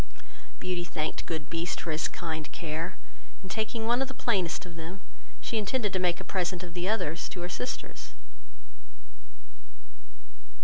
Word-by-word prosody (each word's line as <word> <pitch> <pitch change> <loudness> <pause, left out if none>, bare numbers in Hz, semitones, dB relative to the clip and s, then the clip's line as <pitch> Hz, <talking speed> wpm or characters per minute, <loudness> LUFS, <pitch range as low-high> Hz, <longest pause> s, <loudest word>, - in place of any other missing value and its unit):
Beauty 180 -1 +1
thanked 155 -3 -1
good 160 -3 -1
Beast 165 +2 0
for 165 - -1
his 155 +1 +3
kind 160 -3 -2
care, 165 +2 -2 0.5
and 190 - -6
taking 220 +3 +1
one 240 +3 +5
of 270 - +3
the 265 - -6
plainest 185 -9 +2
of 175 -2 -7
them, 165 +4 -5 0.4
she 225 - +1
intended 210 -1 +2
to 185 - +4
make 175 -1 +4
a - - -4
present 180 -1 +1
of 175 -1 -6
the 180 +2 +1
others 165 -7 +2
to 180 - -4
her 175 - 0
sisters. 125 -3 -3
175 Hz, 160 wpm, -31 LUFS, 165-195 Hz, 0.5 s, one